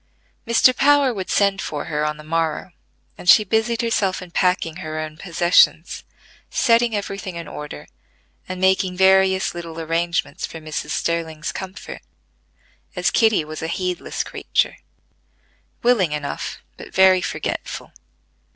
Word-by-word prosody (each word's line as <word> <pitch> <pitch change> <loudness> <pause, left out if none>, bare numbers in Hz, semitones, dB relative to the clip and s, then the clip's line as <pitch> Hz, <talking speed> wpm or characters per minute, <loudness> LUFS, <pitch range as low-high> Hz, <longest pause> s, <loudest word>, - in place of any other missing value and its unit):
Mr. 235 +2 +5
Power 280 -1 +4
would 190 -3 -5
send 200 -1 +2
for 145 -1 -4
her 150 -1 -2
on 150 0 -1
the 155 - -11
morrow, 165 +2 -2 0.5
and 180 - -2
she 215 - +8
busied 225 +3 0
herself 200 -5 0
in 180 -2 -10
packing 180 -2 0
her 155 -3 -6
own 155 0 -5
possessions, 175 -1 +2 0.5
setting 235 -2 +3
every 200 -1 -4
thing 185 -2 -6
in 170 -1 -6
order, 150 - -8 0.6
and 185 0 -4
making 190 -1 +2
various 190 0 +4
little 165 -1 -7
arrangements 165 +1 -2
for - - -4
Mrs. 155 -1 -5
Sterling's 165 -1 -2
comfort, 190 0 -8 0.9
as - - +1
Kitty 220 -9 +3
was 155 0 -7
a 160 - -3
heedless 180 +1 -3
creature; - - -1 1.1
willing 215 -10 +3
enough, 150 -1 -5
but - - -11
very 190 -1 +5
forgetful. - - -4
180 Hz, 140 wpm, -21 LUFS, 160-195 Hz, 1.1 s, she